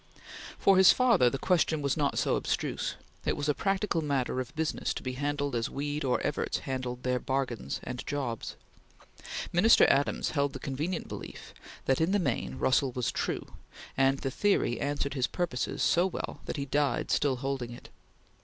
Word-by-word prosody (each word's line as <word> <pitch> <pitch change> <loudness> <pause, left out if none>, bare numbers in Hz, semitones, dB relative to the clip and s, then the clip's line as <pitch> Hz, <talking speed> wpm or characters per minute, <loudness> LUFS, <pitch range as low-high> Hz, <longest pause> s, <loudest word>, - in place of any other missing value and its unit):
For 195 -1 +4
his 190 -1 +9
father 235 - +4
the 135 - -3
question 160 -1 +1
was 140 - +1
not 145 -3 0
so - - +2
abstruse; - - -2 0.3
it - - 0
was 145 - -2
a 150 - +3
practical 195 -1 0
matter 135 -4 -1
of 130 +3 -5
business 160 0 -1
to - - -5
be 130 - -2
handled 145 +1 -2
as 115 -1 -1
Weed 145 +2 -3
or 125 -2 +1
Evarts 145 - -1
handled 125 -2 -4
their 125 0 +1
bargains 130 -2 -2
and 125 0 -5
jobs. 130 -6 -3 1.0
Minister 200 +7 +6
Adams 140 +1 +1
held 140 -2 0
the 135 - -6
convenient 155 +5 -3
belief - - -8 0.3
that, 135 +3 +2
in 170 +4 +2
the - - +4
main, 120 - -1
Russell 130 - +2
was 125 -1 -1
true, - - -2 0.5
and 135 +1 +3
the 135 -1 -3
theory 195 -9 +1
answered 140 0 -1
his 130 -3 +1
purposes 170 -9 -2
so 175 +2 +4
well 190 - -5
that - - -4
he 140 - -2
died 140 -2 0
still 140 -3 +2
holding 130 -1 -3
it. 120 - -11
140 Hz, 180 wpm, -29 LUFS, 130-155 Hz, 1.0 s, his